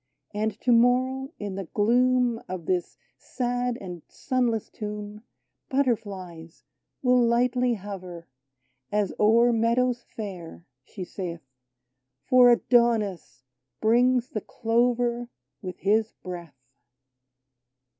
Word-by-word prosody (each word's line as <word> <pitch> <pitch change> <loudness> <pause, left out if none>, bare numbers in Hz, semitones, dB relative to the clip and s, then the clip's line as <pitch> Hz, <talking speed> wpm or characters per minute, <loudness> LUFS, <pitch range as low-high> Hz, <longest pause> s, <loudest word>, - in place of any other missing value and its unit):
And 210 0 -2
to 250 - +2
morrow, 255 +3 +3
in 205 -2 -5
the 195 0 -5
gloom 245 +4 +2
Of 180 -3 -5
this 180 0 -2 0.2
sad 245 -1 -2
and 180 -3 -8
sunless 245 -5 -1
tomb, 210 0 -6 0.5
Butterflies 195 - -2 0.4
will 250 -1 +4
lightly 245 +1 +2
hover. 185 -4 -8 0.7
As 210 -2 0
o'er 235 +3 +5
meadows 240 +2 +1
fair; 180 -6 -8
" 130 - -58
she 190 - -7
saith, 175 -2 -6 0.4
" 130 +1 -56
For 250 -1 +7
Adonis 230 - +2 0.4
brings 245 +3 +3
the 215 - -3
clover 240 +2 0 0.3
With 185 -2 -6
his 215 +3 +1
breath 175 -6 -8
225 Hz, 105 wpm, -26 LUFS, 185-245 Hz, 0.7 s, For